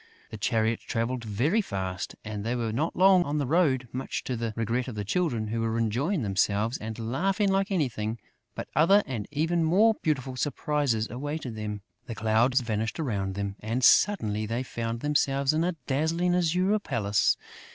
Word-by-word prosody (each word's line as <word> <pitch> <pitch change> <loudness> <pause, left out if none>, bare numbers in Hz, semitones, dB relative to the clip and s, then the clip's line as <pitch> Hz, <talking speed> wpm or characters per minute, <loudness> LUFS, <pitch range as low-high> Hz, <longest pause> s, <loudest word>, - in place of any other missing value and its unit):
The 110 - -6
chariot 110 0 +1
travelled 120 +2 -2
very 125 - +1
fast; 95 - -4
and 105 -1 -5
they 115 +3 -1
were 115 -2 -2
not 150 +9 -1
long 185 0 +6
on 150 -1 -2
the 145 - 0
road, 135 -4 +2
much 130 +1 -4
to 130 - -3
the 115 -1 -2
regret 115 +3 -1
of 125 - -6
the 105 -1 -4
Children, 120 - -1
who 115 +1 -1
were 115 0 -1
enjoying 125 - 0
themselves 105 +4 0
and 110 0 -6
laughing 195 - +1
like 195 +1 +1
anything; 120 - -1 0.4
but - - -5
other 190 +8 +5
and 120 -6 -4
even 165 +3 0
more 200 +8 +4
beautiful 135 -4 -1
surprises 140 -5 0
awaited 135 -1 -4
them. 105 -1 -5 0.3
The 115 - -5
clouds 115 +5 +2
vanished 110 +2 -2
around 100 -10 -2
them; 100 0 -3
and, 115 +4 -2
suddenly, 110 - +4
they 115 +4 -2
found 115 -2 -4
themselves 140 -1 +1
in 160 +1 +1
a 180 0 -1
dazzling 165 +6 +1
azure 180 +4 +2
palace. 105 - +1
125 Hz, 175 wpm, -27 LUFS, 110-160 Hz, 0.4 s, long